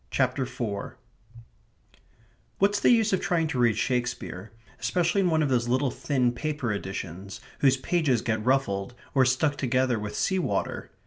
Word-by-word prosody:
CHAPTER 130 Hz, 0 st, 0 dB
FOUR 100 Hz, -4 st, -5 dB, 1.6 s
What's 205 Hz, +1 st, +2 dB
the -, -, +4 dB
use 225 Hz, -4 st, +4 dB
of 190 Hz, -, +1 dB
trying 175 Hz, -4 st, +1 dB
to 130 Hz, -, -2 dB
read 120 Hz, -2 st, +3 dB
Shakespeare, 120 Hz, -6 st, -2 dB, 0.3 s
especially 180 Hz, +2 st, +1 dB
in 180 Hz, -, +2 dB
one 160 Hz, -1 st, +2 dB
of 145 Hz, -, 0 dB
those 120 Hz, -2 st, +1 dB
little 130 Hz, +2 st, +1 dB
thin 125 Hz, -3 st, 0 dB
paper 140 Hz, -3 st, -2 dB
editions 95 Hz, -1 st, -6 dB, 0.2 s
whose 135 Hz, -1 st, +4 dB
pages 135 Hz, -3 st, +1 dB
get 110 Hz, -2 st, -1 dB
ruffled, 120 Hz, -4 st, 0 dB, 0.2 s
or 130 Hz, -2 st, +4 dB
stuck 145 Hz, +3 st, +1 dB
together 130 Hz, -2 st, +1 dB
with 105 Hz, 0 st, -5 dB
sea 190 Hz, -1 st, +1 dB
water? 175 Hz, -, -2 dB
130 Hz, 155 wpm, -27 LUFS, 120-155 Hz, 1.6 s, the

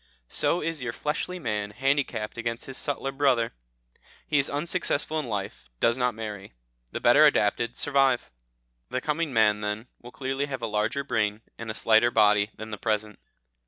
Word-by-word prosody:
So 175 Hz, -, +1 dB
is 165 Hz, -2 st, -2 dB
your 120 Hz, -2 st, -3 dB
fleshly 155 Hz, +6 st, -2 dB
man 105 Hz, -, -2 dB
handicapped 135 Hz, -2 st, -1 dB
against 115 Hz, 0 st, -3 dB
his 135 Hz, -, -7 dB
subtler 135 Hz, -1 st, -2 dB
brother. 135 Hz, -4 st, +2 dB, 0.7 s
He 150 Hz, -, +2 dB
is 140 Hz, -, +1 dB
unsuccessful 155 Hz, 0 st, -1 dB
in 150 Hz, -, -4 dB
life, 95 Hz, -, -5 dB
does 115 Hz, -, +3 dB
not 125 Hz, -2 st, 0 dB
marry. 105 Hz, -, -7 dB, 0.4 s
The -, -, -3 dB
better 130 Hz, +6 st, +6 dB
adapted 120 Hz, -2 st, +1 dB
survive." 135 Hz, -3 st, +2 dB, 0.6 s
The 130 Hz, -, -1 dB
coming 155 Hz, +3 st, -1 dB
man, 105 Hz, -3 st, +3 dB
then, 105 Hz, +3 st, -3 dB
will 120 Hz, -, -10 dB
clearly 135 Hz, +2 st, -2 dB
have 130 Hz, -4 st, -5 dB
a -, -, +2 dB
larger 105 Hz, +5 st, 0 dB
brain, 110 Hz, -4 st, 0 dB, 0.2 s
and 115 Hz, -1 st, -6 dB
a 110 Hz, -, -3 dB
slighter 115 Hz, +1 st, +4 dB
body 105 Hz, -2 st, +4 dB
than 110 Hz, 0 st, -8 dB
the 105 Hz, -, -5 dB
present. 105 Hz, -2 st, -1 dB
120 Hz, 170 wpm, -27 LUFS, 105-140 Hz, 0.7 s, better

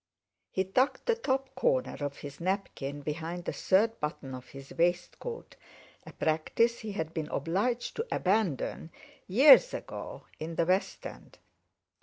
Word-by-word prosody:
He 190 Hz, -, 0 dB
tucked 255 Hz, +9 st, +1 dB
the 475 Hz, -, +4 dB
top 270 Hz, -, -1 dB
corner -, -, +1 dB
of 145 Hz, -1 st, -3 dB
his 145 Hz, -1 st, -9 dB
napkin 160 Hz, -7 st, -2 dB
behind 165 Hz, +4 st, -4 dB
the -, -, -2 dB
third 220 Hz, +4 st, +2 dB
button 150 Hz, -3 st, -4 dB
of 130 Hz, 0 st, -9 dB
his 135 Hz, 0 st, -11 dB
waistcoat, 175 Hz, -, -1 dB, 0.5 s
a -, -, -8 dB
practice 160 Hz, +9 st, +1 dB
he 215 Hz, -2 st, -5 dB
had 160 Hz, -4 st, -3 dB
been 160 Hz, -2 st, -3 dB
obliged 215 Hz, +9 st, -1 dB
to 455 Hz, +2 st, -2 dB
abandon 185 Hz, -, 0 dB, 0.4 s
years 275 Hz, -, +7 dB
ago -, -, -7 dB
in 165 Hz, +1 st, -5 dB
the 170 Hz, -, +2 dB
West 185 Hz, +3 st, 0 dB
End. -, -, -10 dB
185 Hz, 145 wpm, -30 LUFS, 155-235 Hz, 0.5 s, years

